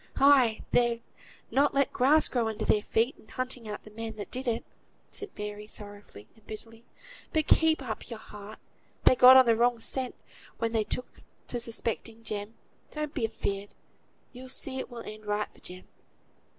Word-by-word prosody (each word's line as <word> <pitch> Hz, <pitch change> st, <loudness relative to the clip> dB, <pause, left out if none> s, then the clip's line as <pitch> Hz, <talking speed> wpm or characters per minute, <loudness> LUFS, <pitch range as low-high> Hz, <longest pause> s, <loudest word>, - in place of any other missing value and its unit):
"Ay! 265 Hz, -5 st, +6 dB
they've 235 Hz, -1 st, +3 dB, 0.5 s
not 280 Hz, +1 st, +3 dB
let 275 Hz, -1 st, +2 dB
grass 295 Hz, +5 st, +5 dB
grow 240 Hz, -3 st, 0 dB
under 220 Hz, -1 st, -3 dB
their 210 Hz, -, +3 dB
feet, 230 Hz, +5 st, +1 dB
in -, -, -19 dB
hunting 250 Hz, -1 st, -4 dB
out 210 Hz, -, -6 dB
the 215 Hz, -, -13 dB
man 225 Hz, 0 st, -6 dB
that 205 Hz, -, -7 dB
did 255 Hz, +1 st, -3 dB
it," 230 Hz, -1 st, 0 dB, 0.5 s
said 415 Hz, -, -1 dB
Mary, 210 Hz, 0 st, -5 dB
sorrowfully 205 Hz, -, -9 dB
and 220 Hz, -, -23 dB
bitterly. 225 Hz, +1 st, -10 dB, 0.5 s
"But 315 Hz, -1 st, +2 dB
keep 320 Hz, -3 st, +4 dB
up 230 Hz, -2 st, -5 dB
your 230 Hz, -, -5 dB
heart. 210 Hz, 0 st, -10 dB, 0.5 s
They -, -, +7 dB
got 255 Hz, +1 st, +10 dB
on 260 Hz, -, +8 dB
the 230 Hz, -1 st, +4 dB
wrong 240 Hz, +1 st, +3 dB
scent 255 Hz, +2 st, -2 dB, 0.4 s
when 230 Hz, 0 st, -1 dB
they 220 Hz, -2 st, +1 dB
took 250 Hz, -, -4 dB, 0.3 s
to 245 Hz, -, -1 dB
suspecting 230 Hz, -1 st, -3 dB
Jem. 210 Hz, 0 st, -4 dB, 0.3 s
Don't 300 Hz, -1 st, -4 dB
be 250 Hz, -7 st, 0 dB
afeard. 200 Hz, -1 st, -4 dB, 0.6 s
You'll 255 Hz, +1 st, -10 dB
see 265 Hz, 0 st, -2 dB
it -, -, -5 dB
will 240 Hz, -2 st, -7 dB
end 215 Hz, 0 st, -9 dB
right 210 Hz, 0 st, 0 dB
for -, -, -20 dB
Jem." 185 Hz, +1 st, -9 dB
230 Hz, 180 wpm, -29 LUFS, 215-255 Hz, 0.6 s, got